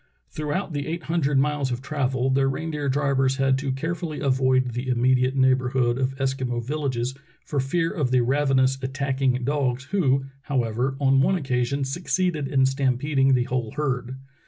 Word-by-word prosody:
Throughout 155 Hz, +4 st, -3 dB
the 145 Hz, 0 st, -3 dB
eight 170 Hz, +2 st, -4 dB
hundred 150 Hz, -4 st, 0 dB
miles 145 Hz, 0 st, +1 dB
of 120 Hz, -, -2 dB
travel 135 Hz, -3 st, -1 dB
the 135 Hz, +1 st, +2 dB
reindeer 150 Hz, +1 st, -2 dB
drivers 135 Hz, -1 st, +1 dB
had 135 Hz, -1 st, +2 dB
to 135 Hz, -1 st, -2 dB
carefully 160 Hz, +3 st, -3 dB
avoid 130 Hz, -2 st, +2 dB
the 125 Hz, +2 st, -4 dB
immediate 125 Hz, +1 st, +2 dB
neighborhood 130 Hz, -2 st, +2 dB
of 135 Hz, 0 st, -1 dB
Eskimo 130 Hz, -3 st, -1 dB
villages 130 Hz, -3 st, -2 dB, 0.3 s
for 145 Hz, -, -2 dB
fear 165 Hz, +5 st, 0 dB
of 145 Hz, -6 st, -1 dB
the 125 Hz, 0 st, +3 dB
ravenous, 135 Hz, 0 st, +2 dB
attacking 130 Hz, -1 st, -1 dB
dogs, 130 Hz, -2 st, 0 dB
who, 135 Hz, -9 st, +2 dB, 0.2 s
however, 125 Hz, -1 st, -1 dB
on 135 Hz, -1 st, +4 dB
one 190 Hz, +7 st, +3 dB
occasion 135 Hz, -3 st, -1 dB
succeeded 170 Hz, +1 st, -1 dB
in 135 Hz, -1 st, +3 dB
stampeding 135 Hz, +1 st, +2 dB
the 125 Hz, -, +2 dB
whole 120 Hz, -3 st, -3 dB
herd. 130 Hz, -4 st, -2 dB
135 Hz, 155 wpm, -24 LUFS, 130-145 Hz, 0.3 s, on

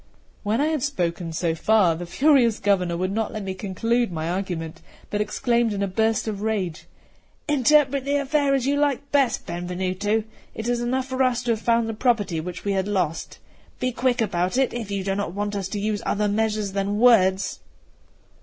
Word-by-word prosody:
When 215 Hz, +3 st, 0 dB
I 290 Hz, -, +3 dB
had 310 Hz, -4 st, -1 dB
spoken 175 Hz, -, -2 dB
so 165 Hz, 0 st, -1 dB
far, 195 Hz, +1 st, +3 dB
the 170 Hz, +2 st, -6 dB
furious 260 Hz, -, +3 dB
Governor 180 Hz, -4 st, +1 dB
would 185 Hz, +2 st, -1 dB
not 220 Hz, +1 st, -1 dB
let 215 Hz, -2 st, -5 dB
me 190 Hz, -1 st, -3 dB
conclude 225 Hz, +4 st, -1 dB
my 160 Hz, 0 st, -3 dB
argument, 175 Hz, -3 st, -4 dB, 0.3 s
but 210 Hz, -, 0 dB
exclaimed 235 Hz, +1 st, +1 dB
in 200 Hz, 0 st, -1 dB
a -, -, 0 dB
burst 220 Hz, +4 st, 0 dB
of 205 Hz, -2 st, -3 dB
rage: 185 Hz, -6 st, -2 dB, 0.6 s
"Interpret 285 Hz, -1 st, +3 dB
the 280 Hz, +1 st, 0 dB
affair 280 Hz, 0 st, +2 dB
as 260 Hz, -2 st, 0 dB
you 285 Hz, +1 st, +1 dB
like 285 Hz, -1 st, 0 dB
best, 275 Hz, -5 st, +2 dB
Benvenuto; 185 Hz, +5 st, -2 dB, 0.3 s
it 225 Hz, -, -4 dB
is 240 Hz, 0 st, 0 dB
enough 255 Hz, +2 st, -1 dB
for 260 Hz, 0 st, -3 dB
us 255 Hz, -1 st, +2 dB
to 240 Hz, -, 0 dB
have 220 Hz, -1 st, -1 dB
found 230 Hz, -1 st, +2 dB
the 225 Hz, -, -3 dB
property 215 Hz, -7 st, +1 dB
which 180 Hz, +3 st, -7 dB
we 200 Hz, -, +1 dB
had 190 Hz, 0 st, 0 dB
lost; 180 Hz, -6 st, -2 dB, 0.4 s
be 255 Hz, -, 0 dB
quick 250 Hz, 0 st, 0 dB
about 185 Hz, 0 st, 0 dB
it, 265 Hz, -2 st, +2 dB
if 230 Hz, -4 st, -5 dB
you 200 Hz, -1 st, -2 dB
do 195 Hz, 0 st, -1 dB
not 200 Hz, -3 st, -3 dB
want 205 Hz, 0 st, -2 dB
us 195 Hz, -2 st, -2 dB
to 205 Hz, +1 st, -4 dB
use 210 Hz, 0 st, -1 dB
other 210 Hz, 0 st, 0 dB
measures 210 Hz, -1 st, 0 dB
than 200 Hz, +1 st, -1 dB
words." 200 Hz, -5 st, +4 dB
210 Hz, 200 wpm, -24 LUFS, 190-245 Hz, 0.6 s, words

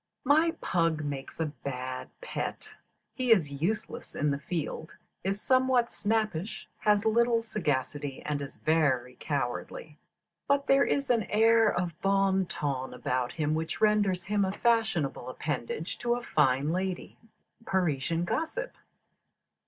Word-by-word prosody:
"My 315 Hz, +5 st, +4 dB
pug 165 Hz, -3 st, +1 dB
makes 140 Hz, 0 st, -5 dB
a 160 Hz, -, +1 dB
bad 130 Hz, -3 st, -5 dB
pet; -, -, -4 dB, 0.5 s
he 255 Hz, -2 st, 0 dB
is 170 Hz, -10 st, +4 dB
useless 210 Hz, +6 st, -2 dB
in 150 Hz, 0 st, +1 dB
the 140 Hz, -, -1 dB
field, 160 Hz, 0 st, -4 dB, 0.3 s
is 195 Hz, +2 st, -1 dB
somewhat 255 Hz, -1 st, +3 dB
snappish, 215 Hz, -3 st, -1 dB
has 210 Hz, 0 st, +3 dB
little 230 Hz, +1 st, +3 dB
sagacity, 145 Hz, -, -2 dB
and 145 Hz, -1 st, -2 dB
is 140 Hz, -1 st, -7 dB
very 135 Hz, -6 st, +1 dB
cowardly: 145 Hz, +2 st, -3 dB, 0.5 s
but 280 Hz, 0 st, +2 dB
there 275 Hz, 0 st, +5 dB
is 275 Hz, -2 st, +1 dB
an 230 Hz, -4 st, +2 dB
air 225 Hz, +1 st, +5 dB
of 175 Hz, -2 st, -3 dB
bon 195 Hz, -1 st, +2 dB
ton 135 Hz, -6 st, -3 dB
about 125 Hz, 0 st, -1 dB
him 155 Hz, -2 st, 0 dB
which 160 Hz, +1 st, -2 dB
renders 205 Hz, -4 st, +3 dB
him 200 Hz, +2 st, +1 dB
a 190 Hz, -, 0 dB
fashionable 220 Hz, -, +1 dB
appendage 145 Hz, +4 st, -3 dB
to 240 Hz, 0 st, +1 dB
a 245 Hz, -, -5 dB
fine 140 Hz, -, +2 dB
lady." 185 Hz, +1 st, -3 dB, 0.5 s
_Parisian 165 Hz, -2 st, 0 dB
Gossip. -, -, -2 dB
175 Hz, 135 wpm, -29 LUFS, 145-220 Hz, 0.5 s, there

